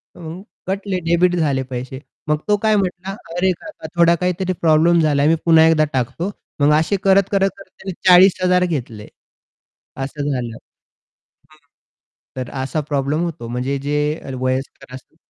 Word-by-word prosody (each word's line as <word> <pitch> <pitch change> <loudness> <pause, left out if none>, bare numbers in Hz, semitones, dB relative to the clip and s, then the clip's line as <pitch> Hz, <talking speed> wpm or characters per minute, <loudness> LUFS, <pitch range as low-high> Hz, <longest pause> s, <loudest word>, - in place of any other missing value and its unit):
मग 170 +1 -8 0.3
कटले 195 -1 -2
डेबिट 175 +1 +3
झाले 145 -5 0
पैसे. 130 +1 -5 0.3
मग 150 0 +2
तो 210 -1 +3
काय 215 -1 +3
म्हटला 190 0 -3 0.2
"अरे 185 +1 +2
काका 310 - -9
थोडा 170 0 +6
काहीतरी 180 +1 -1
प्रॉब्लेम 165 +1 +4
झालाय. 145 -2 +2
मी 165 - +4
पुन्हा 160 -1 +6
एकदा 155 -1 +3
टाकतो." 130 - -2 0.3
मग 145 +1 +5
असे 160 +6 0
करत, 195 0 +5
करत, 195 -1 +2
करत 195 -1 -14
त्याने 190 - -6 0.2
40,000 180 0 +5
घेतले. 120 -10 -5 1.0
असं 145 +1 -4
झालं. 120 -4 -3
हं. 155 +6 -26 0.8
तर 130 -1 -5
असा 135 +4 -2
प्रॉब्लेम 145 +2 0
होतो 155 -8 -6
म्हणजे 125 +3 -2
जे 145 +2 -2 0.4
वयस्कर 130 0 -4
असतात 130 - -13
160 Hz, 150 wpm, -19 LUFS, 135-180 Hz, 1.0 s, थोडा